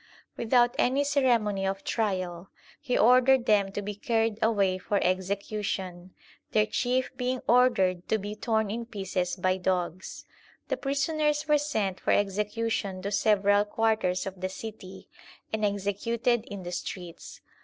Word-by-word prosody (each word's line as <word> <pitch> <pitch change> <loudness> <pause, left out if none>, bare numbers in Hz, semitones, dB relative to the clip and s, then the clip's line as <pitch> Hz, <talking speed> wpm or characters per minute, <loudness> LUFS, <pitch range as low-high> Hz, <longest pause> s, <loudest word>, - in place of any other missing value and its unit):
Without 240 +1 +3
any 270 +3 +3
ceremony 240 -9 +1
of 195 0 -2
trial, 185 -5 -2 0.3
he 260 -4 -1
ordered 255 +2 +5
them 200 -2 +3
to 205 +1 -4
be 205 +1 -4
carried 225 +1 0
away 200 -4 +2
for 200 +2 -1
execution, 190 -1 -3 0.4
their 215 -1 +4
chief 245 +5 -1
being 250 +1 -1
ordered 195 -8 +3
to 220 - +3
be 205 +1 -6
torn 220 -1 0
in 230 +1 -4
pieces 190 -5 -2
by 185 0 0
dogs. 180 -1 -3 0.4
The - - 0
prisoners 300 +2 0
were 300 -1 +4
sent 215 -10 -2
for - - 0
execu 210 +3 0
tion 190 -3 -3
to 200 - -3
several 205 -1 +3
quarters 210 -4 0
of 190 -1 -7
the 185 - -1
city, 190 -1 -9 0.5
and 215 -1 -1
executed 215 +4 0
in 200 -2 -8
the 175 - -6
streets. 175 -1 -7
210 Hz, 145 wpm, -28 LUFS, 190-235 Hz, 0.5 s, ordered